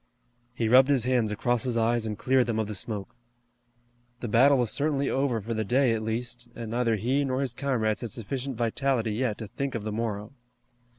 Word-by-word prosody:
He 115 - 0
rubbed 130 +4 +6
his 135 -5 +3
hands 120 -3 +1
across 115 +2 0
his 125 -3 -1
eyes 115 0 +1
and 105 -1 -4
cleared 130 -2 +2
them 115 -2 -1
of 110 - 0
the 105 - -4
smoke. 105 +1 -4 1.0
The 120 - -4
battle 130 +6 +5
was 120 -3 +1
certainly 140 -1 0
over 135 -4 +1
for 115 +3 -4
the 110 0 -1
day 125 +3 +2
at 110 - -2
least, 120 +2 -4
and 115 -2 -6
neither 120 -1 +1
he 125 +7 +1
nor 130 -1 -1
his 130 -4 -1
comrades 115 -5 -1
had 120 - -4
sufficient 125 +4 -4
vitality 120 0 0
yet 115 -1 -1
to 110 - -6
think 135 +5 -4
of 115 - -3
the 110 - -3
morrow. 105 +1 -3
120 Hz, 210 wpm, -27 LUFS, 110-130 Hz, 1.0 s, rubbed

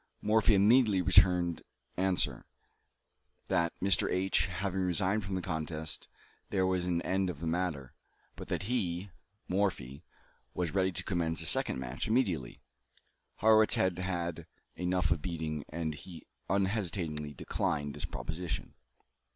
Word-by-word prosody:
Morphy 110 0 +3
immediately 105 0 +5
returned 90 0 +4 0.3
answer, 95 0 0 1.0
that 85 0 +2
"Mr. 95 0 +2
H. 95 +1 +2
having 95 +1 -3
resigned 95 +3 +1 0.2
the 90 - -4
contest, 80 0 -4 0.4
there 95 -2 +1
was 90 -1 0
an 85 -1 0
end 95 0 0
of 80 -5 -6
the 85 - -5
matter, 80 -6 -2 0.4
but - - -8
that - - -2
he 95 -4 -2 0.4
(Morphy) 90 -7 -1 0.5
was 85 -3 -1
ready 95 -1 +2
to 85 - -5
commence 85 -3 -1
a - - -4
second - - +4
match 65 0 -4
immediately." 85 - 0 0.8
Harrwitz 110 -2 +6
had 95 -1 +1
had 85 -3 -3 0.3
enough 90 -2 0
of 80 -2 +1
beating, 80 -4 -3
and 80 -1 -3
he 80 +2 -10 0.2
unhesitatingly 90 -7 -1
declined 75 +2 -2
this - - -5
proposition. 80 +1 -5
90 Hz, 130 wpm, -31 LUFS, 80-95 Hz, 1.0 s, Harrwitz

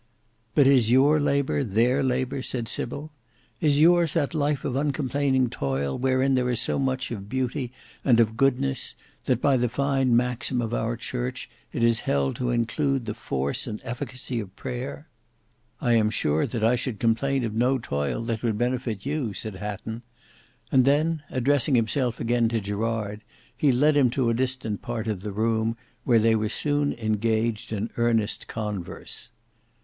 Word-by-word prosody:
"But 145 - +6
is 130 -5 +5
your 140 +5 +5
labour, 140 -1 +1
their 120 +5 +2
labour," 130 0 -1
said 120 -3 -3
Sybil. 145 +6 -3 0.5
"Is 145 -2 +3
yours 170 0 +5
that 150 -3 +1
life 145 -2 0
of 130 - -1
uncomplaining 135 -3 +1
toil 70 - -2
wherein 130 +1 +2
there 125 -1 +2
is 120 - 0
so - - 0
much 130 -1 -1
of 100 -3 -6
beauty 130 0 -2 0.3
and 120 -4 +4
of 110 -1 +3
goodness, 135 +1 0 0.3
that 125 -3 +2
by 135 0 +3
the 125 -1 +1
fine 135 -1 +2
maxim 125 +1 0
of 115 -1 -2
our 115 +1 -1
Church, 125 +2 -4 0.2
it 115 - -2
is 115 -1 +4
held 70 -1 +1
to 125 -1 -1
include 120 +3 0
the 105 - -3
force 70 - -3
and 110 -2 -4
efficacy 125 0 -4
of 100 -3 -7
prayer?" 120 - -6 0.7
"I 120 - +2
am 110 -2 +4
sure 75 -7 +1
that 115 -3 -3
I 115 +3 +4
should 120 -3 -3
complain 130 +4 +1
of 110 -2 -2
no 125 +4 +2
toil 70 - -2
that 115 -1 -2
would 115 -3 0
benefit 120 -3 -2
you," 140 -8 -2
said 110 -3 -3
Hatton; 105 +3 -5 0.7
and 130 - +5
then 150 +4 +2
addressing 135 +1 +2
himself 120 +1 +1
again 120 0 +2
to 115 0 0
Gerard, 105 +1 -3 0.3
he 145 - +3
led 145 +5 +3
him 135 -4 +5
to 120 -3 +2
a - - +1
distant 125 -4 -2
part 120 -2 -4
of 105 -4 -2
the 105 0 -5
room 110 +2 0 0.3
where 120 -3 +4
they 110 0 +4
were 110 -1 0
soon 145 +4 0
engaged 110 0 -1
in 110 +1 -3
earnest 115 -2 +1
converse. 105 +1 -6
120 Hz, 170 wpm, -25 LUFS, 110-135 Hz, 0.7 s, But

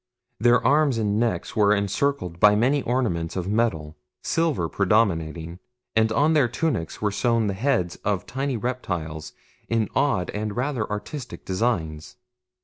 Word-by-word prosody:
Their 120 +1 +4
arms 145 -1 +3
and 105 -1 0
necks 115 -7 -1
were 105 -1 +4
encircled 100 - -1
by 105 +2 +6
many 130 +7 +2
ornaments 110 -11 -1
of 90 -1 -3
metal 100 -9 -1 0.3
silver 160 - 0
predominating 85 -5 0 0.4
and 110 0 +3
on 145 +8 +3
their 145 -5 +4
tunics 120 - -2
were 105 - +2
sewn 115 +2 +1
the 100 - -1
heads 105 -5 0
of 100 -3 -2
tiny 135 +1 -2
reptiles 90 -11 -4 0.4
in 115 -2 +1
odd 135 -10 +1
and 105 0 -4
rather 125 -3 -2
artistic 105 +6 -6
designs. 90 -7 -2
110 Hz, 145 wpm, -24 LUFS, 90-125 Hz, 0.4 s, by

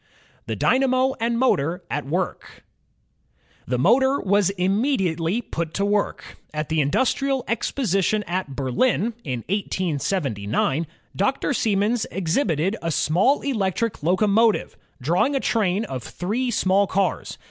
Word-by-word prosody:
The - - -2
Dynamo 260 0 +2
and 230 +1 0
Motor 180 - +1
at 145 -1 -2
Work 180 +5 -3 1.0
The 125 - 0
motor 265 - +3
was 200 -1 +2
immediately 195 - 0
put 165 -5 -4
to 200 - +1
work. 205 0 -2 0.2
At 155 -1 -3
the 160 -1 +2
In 140 - +1
dustrial 265 - +1
Exposition 215 -3 0
at 175 -6 -3
Berlin, 205 - +1
in 125 -6 -3
1879, 155 - -1 0.3
Dr. 260 +8 0
Siemens 215 0 +1
ex 175 -3 -2
hibited 180 - +1
a 165 - -2
small 180 - +2
electric 230 -4 -1
locomotive 205 +6 +2 0.2
drawing 175 - +1
a - - +2
train 210 -4 0
of 130 - -5
three 220 - -2
small 200 -3 +2
cars. 195 +1 -1
195 Hz, 125 wpm, -23 LUFS, 165-235 Hz, 1.0 s, motor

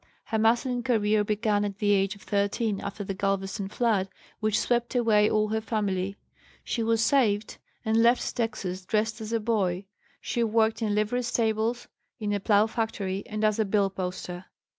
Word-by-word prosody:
Her 220 - -2
masculine 240 +3 +2
career 215 -3 +2
began 210 0 +1
at 200 -1 -3
the 205 -1 +1
age 195 0 +2
of 200 - -16
13 200 +1 0
after 200 +1 -5
the 195 - -3
Galveston 195 +1 -2
flood 210 -4 +1 0.3
which 215 -1 +1
swept 240 +1 0
away 215 -3 +4
all 215 0 +1
her 220 +1 0
family. 200 -4 -1 0.5
She 235 - -2
was 225 0 +2
saved 220 -7 +2 0.3
and 220 +1 +3
left 235 +2 +3
Texas 200 -5 -3
dressed 220 +3 -1
as 220 0 -5
a 230 - +1
boy. 200 -4 0 0.3
She 235 - -1
worked 225 0 +2
in 210 -2 0
livery 215 +4 +1
stables, 230 0 0 0.3
in 210 -2 -1
a 205 - 0
plough 205 +1 +4
factory, 220 -4 -2
and 215 0 -4
as 215 0 +2
a - - +4
bill 200 -1 +1
poster. 180 -1 -5
215 Hz, 175 wpm, -27 LUFS, 200-225 Hz, 0.5 s, away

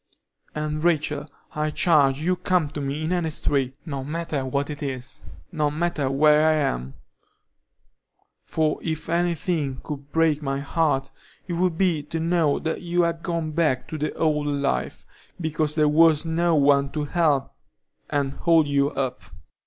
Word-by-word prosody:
"And, 155 0 -3
Rachel, 155 -3 +1 0.3
I 155 -1 -1
charge 145 -3 +3
you 180 +3 +1
to 180 - -27
come 180 -5 +2
to 145 - -5
me 140 +3 -3
in 160 - -2
any 175 -3 0
strait, 135 -3 -1
no 140 -5 -4
matter 155 -1 -3
what 140 +3 -2
it 145 +1 -8
is, 130 -2 -6 0.3
no 155 -4 +1
matter 155 -2 -1
where 150 +3 +4
I - - +4
am; 65 - -2 1.5
for 155 -1 0
if 160 -1 -4
any 170 +1 +1
thing 150 -7 -2
could 145 -1 -7
break 160 -2 +2
my 135 -1 -2
heart, 145 -1 0 0.4
it 175 - -3
would 175 -1 0
be 175 -5 +2
to 150 +3 -5
know 165 -3 +2
that 160 0 -3
you 175 0 +1
had 165 -1 -1
gone 165 -2 -2
back 150 -5 0
to 160 - -4
the 150 +1 -1
old 150 -2 +1
life, 140 -1 -2 0.3
because 155 -2 -1
there 155 -1 +3
was 155 +1 +4
no 165 +1 +1
one 140 -1 +4
to 150 - -1
help 145 -3 +1 0.6
and 140 -2 0
hold 165 -1 +3
you 140 0 +2
up." 130 -4 -3
150 Hz, 170 wpm, -24 LUFS, 140-165 Hz, 1.5 s, where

